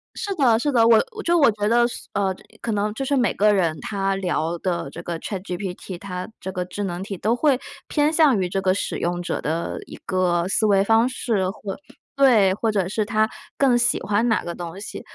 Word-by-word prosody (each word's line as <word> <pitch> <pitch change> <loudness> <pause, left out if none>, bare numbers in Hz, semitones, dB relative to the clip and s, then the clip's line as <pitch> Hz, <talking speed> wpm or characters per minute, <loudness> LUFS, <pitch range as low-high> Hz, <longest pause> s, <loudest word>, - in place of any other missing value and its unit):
是 405 -3 -3
的， 245 -8 +4
是 290 +4 0
的， 230 -2 +5
我 225 -1 +7 0.2
就 345 0 +3
我 280 -6 +6
觉 210 0 -1
得 240 +1 +4
是， - - -9
呃， 195 -2 0 0.3
可 230 - -2
能 210 +1 -1
就 270 +4 -4
是 285 - +1
每 245 -5 +2
个 210 +1 +3
人 170 -5 +1
他 195 -1 -1
聊 175 -3 -1
的 170 -5 -2
这 165 - -8
个 170 -1 -4
ChatGPT， 185 -1 -5
它 180 -2 -5
这 190 - -4
个 180 -1 -3
智 185 +3 -5
能 175 -2 -3
体 195 -2 -6
都 220 +5 +1
会 275 0 +3 0.3
偏 300 0 +2
向 305 -8 +4
于 180 - -1
这 195 +1 -1
个 185 -1 +2
使 195 - -2
用 175 +1 -2
者 175 - -3
的 165 +2 -2
一 - - -10
个 180 -2 +1
思 215 - +2
维 200 -2 +4
方 225 +3 +4
式。 210 -7 -1
或 195 -1 -6 0.4
对， 225 -9 +5
或 220 +3 -1
者 195 -4 0
是 210 +1 -1
它 215 +1 +1 0.3
更 260 -3 +4
喜 240 0 +2
欢 210 +3 +1
哪 225 - +1
个 170 - -4
东 170 0 -7
西， - - -7
200 Hz, 260 characters per minute, -23 LUFS, 185-230 Hz, 0.4 s, 我